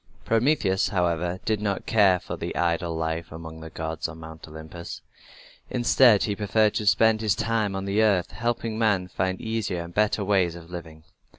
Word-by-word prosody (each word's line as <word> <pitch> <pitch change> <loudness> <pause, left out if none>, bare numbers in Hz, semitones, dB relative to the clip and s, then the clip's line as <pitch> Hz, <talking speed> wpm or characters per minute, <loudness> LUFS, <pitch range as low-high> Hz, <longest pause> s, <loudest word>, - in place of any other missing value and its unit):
Prometheus, 115 -5 +2
however, 90 -1 0
did 110 -2 0
not 100 -2 -2
care 100 -5 +4
for - - -6 0.2
idle 85 -1 0
life 80 +1 -3
among 80 0 -9
the 80 0 -9
gods 80 0 -4
on 80 -1 -10
Mount 80 0 -10
Olympus. 80 +2 -9 0.7
Instead 120 -3 +4
he 105 - -1
preferred 105 +1 +2
to 105 - -2
spend 110 +1 +4
his 110 -3 +2
time 110 -3 0
on 95 0 -3
the 100 +2 +1
earth, 100 -5 +2
helping 115 -1 -2
men 100 -5 +1
to - - -26
find 95 0 -1
easier 110 -6 -2
and 85 +1 -11
better 105 0 +1
ways 95 -4 +2
of 85 0 -12
living. 80 -3 -9
95 Hz, 180 wpm, -25 LUFS, 85-110 Hz, 0.7 s, care